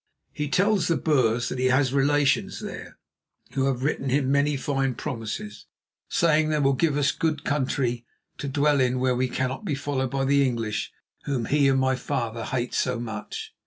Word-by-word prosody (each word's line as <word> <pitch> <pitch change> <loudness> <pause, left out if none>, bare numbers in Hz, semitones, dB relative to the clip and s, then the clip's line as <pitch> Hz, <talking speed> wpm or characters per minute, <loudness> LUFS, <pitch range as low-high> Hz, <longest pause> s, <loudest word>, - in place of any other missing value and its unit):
He 150 -1 -3
tells 195 +1 +2
the 170 - +2
Boers 120 -6 +2
that 130 - -4
he 130 - +2
has 130 0 +2
relations 140 0 +2
there - - -8 0.5
who 135 -1 0
have 130 -2 -1
written 140 -2 -1
him 135 0 +1
many 140 +1 +2
fine 135 -2 -1
promises, 110 -3 -5 0.4
saying 155 -2 +3
they 155 - +1
will 140 -2 +3
give 145 +1 +1
us 140 -2 +3
good 155 0 -1
country 130 -4 -1 0.4
to 145 - -4
dwell 145 +1 +2
in 125 0 +2
where 125 0 +1
we 130 +1 +1
cannot 130 +8 -2
be 155 -8 -1
followed 135 -2 -2
by 135 +1 -1
the 140 +1 +4
English, 115 -5 -2 0.3
whom 130 -5 -1
he 145 +1 +3
and 135 -1 +3
my 130 0 +2
father 115 -4 -3
hate 125 -1 -2
so 125 -2 0
much." 110 -3 -6
135 Hz, 185 wpm, -25 LUFS, 125-145 Hz, 0.5 s, the